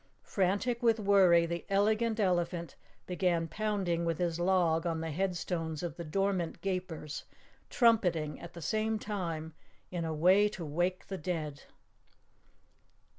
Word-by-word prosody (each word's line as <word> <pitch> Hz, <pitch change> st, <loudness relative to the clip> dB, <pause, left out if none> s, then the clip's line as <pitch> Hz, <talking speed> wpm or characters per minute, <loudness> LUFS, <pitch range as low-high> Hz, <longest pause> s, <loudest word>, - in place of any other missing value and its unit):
Frantic 205 Hz, +6 st, 0 dB
with 230 Hz, -2 st, +3 dB
worry, 190 Hz, -5 st, +5 dB
the 170 Hz, 0 st, -4 dB
Elegant 215 Hz, +3 st, +2 dB
Elephant 175 Hz, -3 st, 0 dB, 0.3 s
began 175 Hz, -2 st, 0 dB
pounding 195 Hz, -4 st, -1 dB
with 165 Hz, -2 st, 0 dB
his 170 Hz, -1 st, -1 dB
log 175 Hz, -2 st, +2 dB
on 165 Hz, -1 st, -1 dB
the 160 Hz, 0 st, -3 dB
headstones 170 Hz, -2 st, -2 dB
of 175 Hz, -, -4 dB
the 170 Hz, -, -6 dB
dormant 185 Hz, +1 st, -1 dB
Gapers, 180 Hz, -6 st, -4 dB, 0.4 s
trumpeting 180 Hz, -, +2 dB
at 170 Hz, -, -10 dB
the 170 Hz, -, -8 dB
same 220 Hz, +3 st, 0 dB
time 170 Hz, -7 st, -4 dB, 0.4 s
in 175 Hz, -2 st, -2 dB
a 160 Hz, -, -2 dB
way 185 Hz, +7 st, +4 dB
to 185 Hz, -5 st, -7 dB
wake 175 Hz, +5 st, -1 dB
the 190 Hz, -1 st, -5 dB
dead. 155 Hz, -4 st, -4 dB
180 Hz, 135 wpm, -31 LUFS, 165-200 Hz, 0.4 s, worry